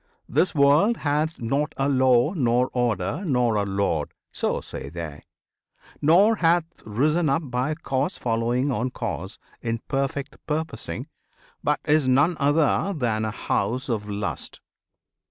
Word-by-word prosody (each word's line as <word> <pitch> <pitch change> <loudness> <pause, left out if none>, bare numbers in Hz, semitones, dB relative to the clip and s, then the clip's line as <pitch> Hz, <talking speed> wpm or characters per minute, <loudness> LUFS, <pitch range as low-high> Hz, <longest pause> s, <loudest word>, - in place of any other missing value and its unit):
"This 185 - +1
world 150 +11 +4
Hath 150 +2 -1
not 140 +6 -1
a 135 - +1
Law, 130 +2 +3
nor 125 -5 +1
Order, 120 - -1
nor 125 - +2
a 105 -1 +1
Lord," 95 -6 -1 0.2
So - - -1
say 65 +1 -8
they: 80 -2 -7 0.8
"nor 195 +9 +5
hath 170 -1 +3 0.2
risen 150 +9 +1
up 140 +5 +1
by 130 +5 0
Cause 145 +2 -2
Following 120 +4 0
on 125 +1 -1
Cause, 105 -6 -5 0.2
in 115 -1 -1
perfect 140 +1 -2
purposing, 160 +1 -3 0.6
But - - +1
is 150 -2 +3
none 140 +7 +4
other 150 +6 +2
than 110 -5 0
a - - -1
House 125 +4 -2
of 105 -3 -2
Lust." 100 0 -4
130 Hz, 135 wpm, -24 LUFS, 115-150 Hz, 0.8 s, nor